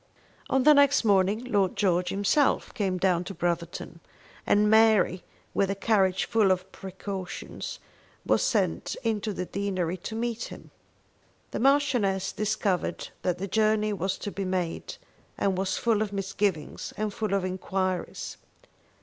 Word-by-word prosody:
On 265 -1 +2
the 300 - +8
next 285 -3 +4
morning 200 +2 +3
Lord 205 -7 +1
George 180 -3 +1
himself 205 +9 +1
came 195 -6 -1
down 180 -1 +2
to 195 - -7
Brotherton, 170 0 -3 0.5
and 210 +1 +4
Mary 220 -4 +4 0.3
with 195 - +1
a 195 - 0
carriage 195 -3 +2
full 220 -4 +3
of 185 0 0
precautions, 190 -1 -6 0.5
was - - +3
sent - - 0
into 220 -2 -1
the 185 -2 -3
deanery 185 -3 -2
to 220 +5 -6
meet 230 0 -2
him. - - -11 0.8
The - - -3
Marchioness 250 -8 +2
discovered 210 -3 -1
that 180 -2 0
the 195 - -4
journey 215 +1 +2
was 190 0 -2
to 205 - -5
be 200 - -4
made, 185 -3 -3 0.4
and 195 -1 +1
was 190 0 -1
full 225 -3 +1
of 215 -2 -1
misgivings 195 -4 -2
and 215 -1 -2
full 215 -2 -1
of 195 -2 0
enquiries. 185 0 -3
195 Hz, 145 wpm, -27 LUFS, 185-215 Hz, 0.8 s, the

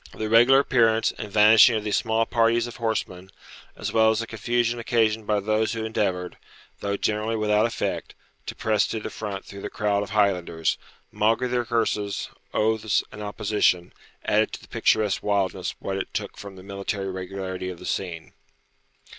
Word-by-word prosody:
The - - -6
irregular 115 +5 +6
appearance 115 -5 +3
and 105 -2 -6
vanishing 110 +2 +7
of 110 - -2
these 105 -1 0
small 115 -1 +1
parties 115 0 +2
of 120 - -8
horsemen, 100 -5 -3 0.5
as - - -5
well 110 -1 +5
as 110 - +1
the 115 - -2
confusion 120 +2 -1
occasioned 110 -2 +1
by 105 -1 +2
those 110 +2 0
who 115 -1 -3
endeavoured, 95 -5 -2 0.4
though 100 0 -2
generally 110 +2 -1
without 105 0 +2
effect, 115 - -4 0.3
to - - -5
press 110 -2 +1
to 110 - -3
the - - -6
front 100 -3 -6
through 100 0 -10
the - - -5
crowd 105 -2 0
of 105 - -5
Highlanders, 90 -6 +1 0.3
maugre 115 +4 +1
their 120 -1 -1
curses, 110 -3 -1 0.2
oaths, 110 -1 +1
and 105 - -9
opposition, 105 -4 0 0.3
added - - +2
to - - -6
the - - -14
picturesque 105 -3 +1
wildness 100 -2 -1
what 95 0 -4
it 95 - -4
took - - -3
from 100 -1 -10
the 95 - -12
military 100 0 -4
regularity 95 0 -5
of 90 - -7
the - - -11
scene. 85 -4 -4
105 Hz, 175 wpm, -25 LUFS, 100-115 Hz, 0.5 s, vanishing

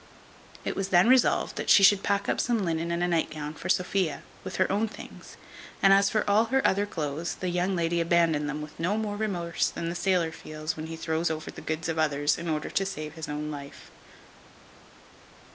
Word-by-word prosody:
It - - -2
was 195 -1 -2
then 180 +2 +5
resolved 255 0 +3
that - - -3
she 200 - +7
should 195 0 +7
pack 200 0 0
up - - 0
some 230 -5 0
linen 165 0 -1
and 170 +1 -1
a - - +2
night 170 -2 +1
gown 150 -1 -6
for 170 +4 -7
Sophia, 180 -4 0 0.2
with 185 -1 -6
her 185 - +1
own 210 +3 +1
things; 220 - -12 0.4
and 195 0 +6
as 195 0 +4
for 215 - 0
all 210 +3 +4
her 265 +3 +2
other 200 +2 +1
clothes, 155 -2 -3
the 185 - -3
young 180 +2 0
lady 170 0 0
abandoned 165 -3 +2
them 150 +1 -4
with 150 - -12
no 180 +6 0
more 215 -2 -2
remorse 180 -6 -1
than 170 - -4
the 170 - -4
sailor 180 -3 +1
feels 155 0 -5
when 155 0 -6
he 165 - -6
throws 160 +1 -1
over 160 -1 -4
the - - -10
goods 155 +1 -3
of 165 -1 -2
others, 145 -1 +1
in 170 0 -4
order 155 -1 -2
to 195 - +1
save 155 -6 -5
his 160 -1 -7
own 150 +1 -4
life. 140 -1 -10
170 Hz, 215 wpm, -27 LUFS, 155-195 Hz, 0.4 s, she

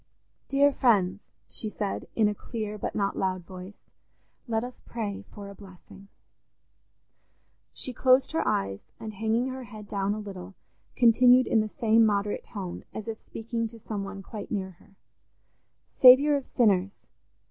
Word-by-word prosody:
"Dear 280 +1 +4
friends," 205 -7 +1 0.2
she 215 - -4
said 205 -1 -4
in 220 -2 +4
a 210 - 0
clear 215 0 -5
but - - -4
not 200 -1 0
loud 185 -1 -1
voice 185 +2 -12 0.6
"let 225 -1 0
us 250 0 -8
pray 215 -4 -5
for 205 -1 -10
a 200 - -9
blessing." 195 0 -15 1.6
She 255 - -3
closed 255 +2 +3
her 325 - 0
eyes, 95 0 0 0.2
and 220 -1 -7
hanging 225 +5 0
her 260 -1 -6
head 210 -1 -11
down 200 0 -1
a - - -5
little 195 -2 -9 0.4
continued 250 +1 +6
in 225 - +2
the 215 0 -1
same 225 -1 +3
moderate 205 -1 0
tone, 190 -5 -7
as 215 - -6
if 225 -1 -5
speaking 230 0 -4
to 230 +1 -13
some 210 -2 -5
one 195 0 -7
quite 210 0 -8
near 190 -3 -3
her: 195 - -23 1.1
"Saviour 270 +4 +8
of 275 -2 -3
sinners! 200 -4 +2
215 Hz, 160 wpm, -27 LUFS, 200-235 Hz, 1.6 s, Saviour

